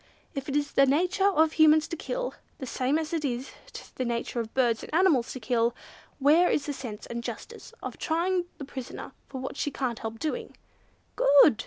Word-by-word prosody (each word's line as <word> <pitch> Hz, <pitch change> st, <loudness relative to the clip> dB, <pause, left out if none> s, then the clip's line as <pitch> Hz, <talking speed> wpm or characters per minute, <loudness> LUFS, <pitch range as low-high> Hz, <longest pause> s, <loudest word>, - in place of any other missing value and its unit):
If 275 Hz, -2 st, -4 dB
it 275 Hz, -, -2 dB
is 290 Hz, -1 st, 0 dB
the 275 Hz, -, +5 dB
nature 360 Hz, +8 st, +3 dB
of 320 Hz, -5 st, +4 dB
Humans 315 Hz, 0 st, +5 dB
to -, -, -3 dB
kill, -, -, -3 dB, 0.2 s
the 265 Hz, -, -6 dB
same 260 Hz, +3 st, 0 dB
as 320 Hz, 0 st, -3 dB
it 325 Hz, -2 st, 0 dB
is 255 Hz, -1 st, -2 dB, 0.5 s
the 255 Hz, -, 0 dB
nature 235 Hz, 0 st, -2 dB
of 225 Hz, -1 st, -4 dB
birds 240 Hz, -4 st, +2 dB
and -, -, -9 dB
animals 325 Hz, -10 st, +4 dB
to 260 Hz, -, -6 dB
kill, 235 Hz, 0 st, +1 dB, 0.4 s
where 305 Hz, +6 st, +5 dB
is 290 Hz, -, +1 dB
the 290 Hz, -, -2 dB
sense 230 Hz, -6 st, -7 dB
and 235 Hz, 0 st, -5 dB
justice -, -, -7 dB
of -, -, -6 dB
trying 350 Hz, +2 st, +1 dB
the 280 Hz, -, -6 dB
prisoner 265 Hz, -2 st, -7 dB, 0.2 s
for 265 Hz, -, -6 dB
what 265 Hz, +2 st, -5 dB
she -, -, 0 dB
can't 250 Hz, -5 st, -3 dB
help 225 Hz, 0 st, -5 dB
doing?" 380 Hz, -, -4 dB, 0.6 s
"Good!" 280 Hz, -4 st, +6 dB
280 Hz, 200 wpm, -28 LUFS, 245-320 Hz, 0.6 s, Good